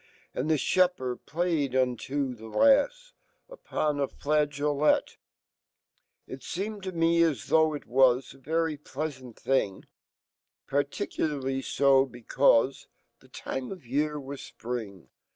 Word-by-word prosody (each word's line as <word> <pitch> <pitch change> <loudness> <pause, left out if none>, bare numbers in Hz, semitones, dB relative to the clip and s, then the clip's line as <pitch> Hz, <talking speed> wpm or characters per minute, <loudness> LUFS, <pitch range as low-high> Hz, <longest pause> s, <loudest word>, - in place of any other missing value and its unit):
And 135 +5 -2
he 155 - +3
fhepherd 175 -7 +1
playeduniofhelafs, 145 - +1 0.4
Vpona 150 - -2
flageolet 150 0 +1 1.1
It 130 - -9
seemed 205 +3 -4
to 190 0 -4
me 170 -1 +2
as 155 -10 +1
though 160 0 +5
ft 150 -2 -6
was 130 0 +3
A 135 - -18
very 160 +2 -1
pleasant 135 -4 -6
fhing$ 105 -8 -1 0.8
Particularly 140 -2 -2
fo 135 0 +3
becaufe 125 +1 +2 0.3
The - - -21
time 130 -1 -5
of 185 -8 -9
year 150 +4 -1
was 140 0 -7
Spring. 110 -7 -7
145 Hz, 105 wpm, -28 LUFS, 130-160 Hz, 1.1 s, though